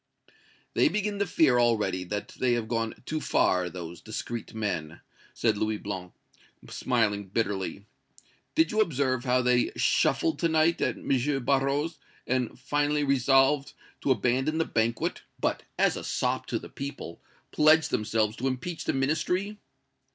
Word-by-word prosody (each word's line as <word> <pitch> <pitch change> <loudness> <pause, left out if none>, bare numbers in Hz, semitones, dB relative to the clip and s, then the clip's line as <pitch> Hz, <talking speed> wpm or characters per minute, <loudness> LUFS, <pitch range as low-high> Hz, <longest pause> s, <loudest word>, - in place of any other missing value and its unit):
"They - - +4
begin 210 -3 -2
to 200 - +1
fear 135 -7 +4
already 105 -6 +1
that 105 +3 -4
they 125 -2 0
have 115 -2 -1
gone 115 -1 -1
too 155 0 -3
far, 90 -8 +2
those 85 -1 -8
discreet 115 +1 -5
men!" 90 -7 -3 0.4
said 110 -3 +1
Louis 110 0 0
Blanc, 95 -3 -6 0.6
smiling 105 -5 0
bitterly. 100 -2 -2 0.7
"Did 325 +1 +3
you 215 0 +3
observe 135 - 0
how 125 0 +2
they 125 0 +2
shuffled 330 -2 +2
to 170 - +2
night 160 +1 +2
at - - 0
M. 135 0 0
Barrot's, 140 +3 +1 0.3
and 125 -2 -1
finally 145 +2 0
resolved 135 +1 +3 0.3
to - - -1
abandon 130 +6 +1
the 165 - +1
banquet, 115 0 -1 0.2
but, - - 0 0.2
as - - +3
a - - -6
sop - - -1
to - - -1
the - - -8
people, 140 -11 -7 0.3
pledged 155 +1 +4
themselves 110 0 0
to 130 - -1
impeach 135 +6 -4
the - - +1
Ministry?" 180 +9 -1
125 Hz, 150 wpm, -28 LUFS, 110-150 Hz, 0.7 s, They